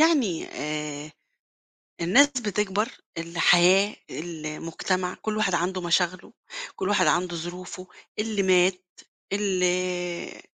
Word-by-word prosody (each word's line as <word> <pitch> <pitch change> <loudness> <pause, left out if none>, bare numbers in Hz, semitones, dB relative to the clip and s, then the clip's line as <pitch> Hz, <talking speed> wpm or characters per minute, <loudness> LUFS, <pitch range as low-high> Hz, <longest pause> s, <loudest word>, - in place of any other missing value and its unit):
يعني 280 - +3
آآ 150 0 -4 0.9
الناس 230 +13 +6
بتكبر 210 -4 -1 0.3
الحياة 175 +4 +4
المجتمع 165 +3 -3
كل 215 -1 -2
واحد 195 -4 +2
عنده 180 +2 -1
مشاغله، 175 +1 0 0.4
كل 190 - -2
واحد 185 -5 +3
عنده 175 +3 +1
ظروفه 180 +2 -7 0.3
اللي 210 -2 0
مات، 185 0 +3 0.5
اللي 180 -3 -1
180 Hz, 95 wpm, -26 LUFS, 170-200 Hz, 0.9 s, الناس